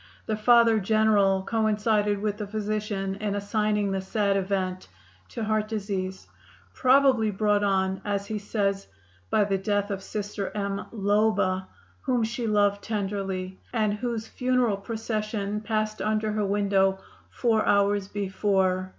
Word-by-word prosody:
The 215 - -1
Father 230 0 +5
General 205 -2 +3
coincided 210 -1 +1
with 210 -1 -1
the 210 -1 -5
physician 210 -2 -2
in 205 -1 -2
assigning 210 0 0
the 195 0 -1
sad 200 0 0
event 190 -1 -2 0.4
to 230 - -5
heart 215 0 0
disease, 195 -3 -4 0.5
probably 260 -4 +4
brought 205 0 +1
on, 190 -1 +1
as 200 -1 -2
he 215 0 -3
says, 200 -1 -1 0.4
"by 210 - +3
the 195 -1 0
death 205 0 -1
of 195 -1 -3
Sister 205 0 -4
M. 200 -1 -2
Loba, 205 -3 +1 0.3
whom 250 -3 +1
she 235 +1 -2
loved 205 -1 +2
tenderly, 195 -3 -3
and 215 -3 +1
whose 225 0 -3
funeral 250 -3 0
procession 215 -1 -3
passed 215 -1 -2
under 215 0 0
her 210 -1 0
window 195 -1 +2 0.3
four 225 -3 +1
hours 200 -1 +2
before." 190 -2 0
205 Hz, 135 wpm, -26 LUFS, 195-215 Hz, 0.5 s, Father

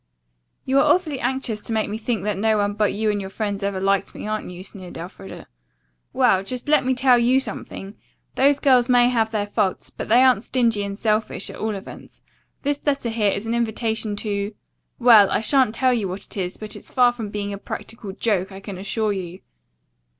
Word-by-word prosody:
"You 270 +1 +3
are 300 +1 +5
awfully 315 -7 -3
anxious 245 -4 -2
to 225 - -4
make 220 -1 0
me 215 +2 -4
think 225 -3 -2
that 210 -1 -1
no 215 +3 +2
one 205 0 0
but 210 -1 +1
you 215 +1 0
and 205 -1 -2
your 190 - -6
friends 205 0 -3
ever 200 -1 -2
liked 195 0 0
me, - - -7
aren't 215 -2 -3
you?" 180 0 -9
sneered 190 -2 -9
Elfreda. 185 +3 -9 0.7
"Well, 190 - +3
just 250 +6 -5
let 300 -2 +4
me 260 0 +1
tell 250 -1 +5
you 250 +3 +4
something. 205 -4 -6 0.4
Those 280 +1 +3
girls 255 -3 +4
may 245 -1 +5
have 225 -3 +1
their 215 -2 -1
faults, 205 -2 -1
but - - -7
they 240 +4 +6
aren't 255 -6 +4
stingy 235 -4 +1
and 200 0 -5
selfish, 215 -2 -1
at - - -10
all 220 -1 -2
events. 195 - -11 0.4
This 285 0 -1
letter 275 -5 0
here 220 -2 +1
is 200 +2 -2
an 225 - -1
invitation 220 -2 -1
to, 205 0 -3 0.4
well, 230 -5 +7
I - - +1
shan't 255 -1 +3
tell 255 +2 +3
you 220 -5 -1
what 185 +2 -6
it - - -10
is, 185 -2 -3
but 215 -1 -8
it's - - -9
far 250 -2 +4
from 230 -4 -6
being 205 0 -4
a 200 - -6
practical 215 -1 -7
joke, 195 -2 -1
I 190 - -9
can 195 -2 -8
assure 210 +2 -1
you." 185 -2 -6
215 Hz, 215 wpm, -22 LUFS, 200-245 Hz, 0.7 s, well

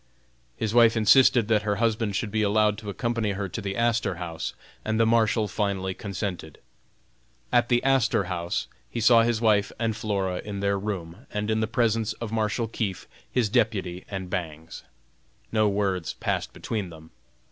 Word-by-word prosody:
His 110 -1 -2
wife 115 -1 +6
insisted 115 +1 +5
that 110 -2 +3
her 105 -1 0
husband 110 -1 0
should 105 +2 -2
be 110 +1 0
allowed 105 0 +2
to 105 -2 -7
accompany 115 -1 -1
her 100 0 -3
to - - -5
the 95 0 -4
Astor 115 -4 +1
House, 85 -2 -5 0.3
and 110 +1 -1
the 115 - +5
Marshal 110 -1 +2
finally 95 -2 -1
consented. 95 -6 -5 0.9
At 120 -1 +3
the 120 -1 +3
Astor 130 -6 +3
House 85 -2 -2 0.2
he 120 - -4
saw 115 +1 +6
his 115 -1 +1
wife 105 -3 +3
and 115 -1 -1
Flora 100 -4 -2
in 100 -2 -5
their 100 0 0
room, 95 +1 -5
in 105 +1 -1
the 110 - 0
presence 115 -2 +1
of 110 0 -6
Marshal 110 +1 0
Keefe, 100 -5 -4 0.2
his 125 -4 +2
deputy, 100 -5 0
and 95 -2 -5
Bangs. 80 -4 -5 0.7
No 110 -2 +3
words 100 -4 -1
passed - - -2
between 105 -5 -4
them. 80 -1 -13
105 Hz, 170 wpm, -26 LUFS, 95-115 Hz, 0.9 s, wife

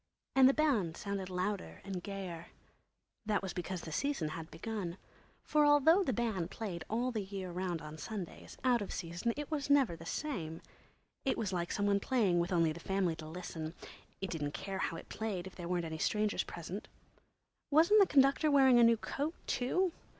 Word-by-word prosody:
And 265 -1 +8
the - - +4
band 230 - +2
sounded 200 -2 -3
louder 185 +2 -2
and 190 -2 -4
gayer. 180 -4 -6 0.8
That 205 -2 +1
was 190 - -3
because 180 0 -4
the 160 - -7
Season 230 - 0
had 160 +1 -6
begun. 195 -3 -4 0.5
For 300 -1 +3
although 295 +6 +6
the 270 - 0
band 215 -7 -1
played 190 -7 -5
all 240 +4 0
the 220 -3 -2
year 190 -2 -5
round 175 -2 -2
on 155 +1 -8
Sundays, 200 -3 -7
out 245 -3 +3
of 200 - -4
season 175 +6 -2
it 295 0 -5
was 290 -2 -2
never 275 -11 +4
the 165 0 -10
same. 165 - -3 0.6
It 270 - +1
was 200 -4 -2
like 175 -1 -1
some 205 - 0
one 200 0 +3
playing 200 -7 +2
with 170 +2 0
only 165 -3 +3
the 170 - -9
family 190 -2 0
to 155 -1 -8
listen; 160 -1 -6 0.5
it 195 - -3
didn't 145 -3 -2
care 195 -1 -4
how 165 - -1
it - - -10
played 205 -5 -3
if 190 - -9
there 175 -2 -7
weren't 175 -1 0
any 160 -1 -5
strangers 210 +2 +1
present. 175 +4 -6 0.8
Wasn't 330 +8 +6
the 390 - +6
conductor 275 +2 +4
wearing 265 -4 +6
a - - +7
new 230 0 +6
coat, 290 +8 -3
too? 360 +9 +1
195 Hz, 195 wpm, -34 LUFS, 170-255 Hz, 0.8 s, And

